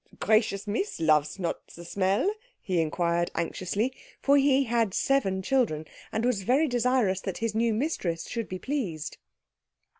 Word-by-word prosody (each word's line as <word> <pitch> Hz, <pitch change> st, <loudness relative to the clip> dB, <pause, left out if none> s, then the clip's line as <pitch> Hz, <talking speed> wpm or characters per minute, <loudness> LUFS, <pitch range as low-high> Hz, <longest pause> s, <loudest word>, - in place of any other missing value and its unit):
"The -, -, -20 dB
gracious 215 Hz, -2 st, +2 dB
Miss 230 Hz, -, -2 dB
loves 155 Hz, -1 st, +3 dB
not 175 Hz, -3 st, -3 dB
the 170 Hz, -, -10 dB
smell?" 195 Hz, -, +1 dB, 0.3 s
he 185 Hz, -5 st, 0 dB
inquired 170 Hz, +2 st, 0 dB
anxiously; 185 Hz, +8 st, -1 dB, 0.3 s
for 280 Hz, -, +4 dB
he 275 Hz, -1 st, +4 dB
had 230 Hz, -5 st, 0 dB
seven 195 Hz, -9 st, +1 dB
children, 200 Hz, -, +1 dB, 0.3 s
and 225 Hz, -, -1 dB
was 245 Hz, -5 st, +1 dB
very 265 Hz, +10 st, +3 dB
desirous 245 Hz, -6 st, +1 dB
that 190 Hz, -, -4 dB
his 230 Hz, -1 st, -1 dB
new 230 Hz, +1 st, +2 dB
mistress 210 Hz, -, -1 dB
should 230 Hz, -2 st, -4 dB
be 185 Hz, -, -4 dB
pleased. 180 Hz, -, -3 dB
205 Hz, 155 wpm, -28 LUFS, 175-250 Hz, 0.3 s, for